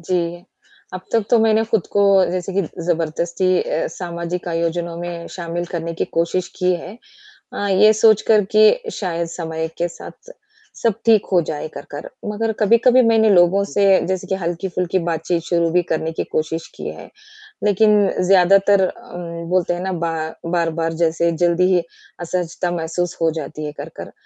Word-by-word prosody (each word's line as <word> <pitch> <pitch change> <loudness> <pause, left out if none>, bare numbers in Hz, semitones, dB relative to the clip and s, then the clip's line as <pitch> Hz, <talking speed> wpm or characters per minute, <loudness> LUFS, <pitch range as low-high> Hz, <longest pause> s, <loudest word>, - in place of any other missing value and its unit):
जी, 175 0 -2 0.5
अब 185 - -5
तक 225 -3 +2
तो 240 - +5
मैंने 220 0 +3
खुद 220 -4 0
को 205 - +3 0.3
जैसे 185 +1 -3
कि 195 +1 +1 0.2
ज़बरदस्ती 170 +2 0
अ, 155 - -2
सामाजिक 170 0 -5
आयोजनों 170 0 -2
में 170 -1 -6
शामिल 175 0 -4
करने 170 -1 -4
की - - +3
कोशिश 175 +2 -1
की 180 -1 +2
है। 190 +6 -8 0.5
अ, 205 - -3
ये 215 +3 +5
सोच 215 -1 +4
कर 215 -2 +5
कि 455 - +4
शायद 170 -3 -3
समय 160 -1 -4
के 175 - 0
साथ - - -13 0.5
सब 230 -3 +2
ठीक 220 -3 +4
हो 180 - +5
जाए 150 -1 -3
कर 140 - -8
कर। 145 - -7 0.2
मगर 225 +1 -1
कभी-कभी 235 +4 +5
मैंने 225 -1 +4
लोगों 185 +1 +4
से 200 - +2 0.2
जैसे 185 -1 -2
कि 190 - -1
हल्की-फुल्की 180 +1 -2
बातचीत 165 +1 -1
शुरू 170 -1 0
भी 180 +1 +2
करने 160 0 -1
की - - -3
कोशिश 160 +1 -2
की - - -6
है। - - -9 0.5
लेकिन 210 0 +4
ज़्यादातर 195 +1 +4
अ, 235 -5 -11 0.3
बोलते 180 -1 +1
हैं 175 - -5
ना 190 - -2
बा 170 -2 -2 0.3
बार-बार 165 -1 -1
जैसे 170 +1 +2
जल्दी 175 +2 +2
ही 175 - +2 0.4
असहजता 175 0 -2
महसूस 175 +1 -3
हो 165 - +3
जाती 150 +2 -7
है 150 - -5
कर - - -8
कर, - - -8
175 Hz, 170 wpm, -20 LUFS, 170-200 Hz, 0.5 s, तो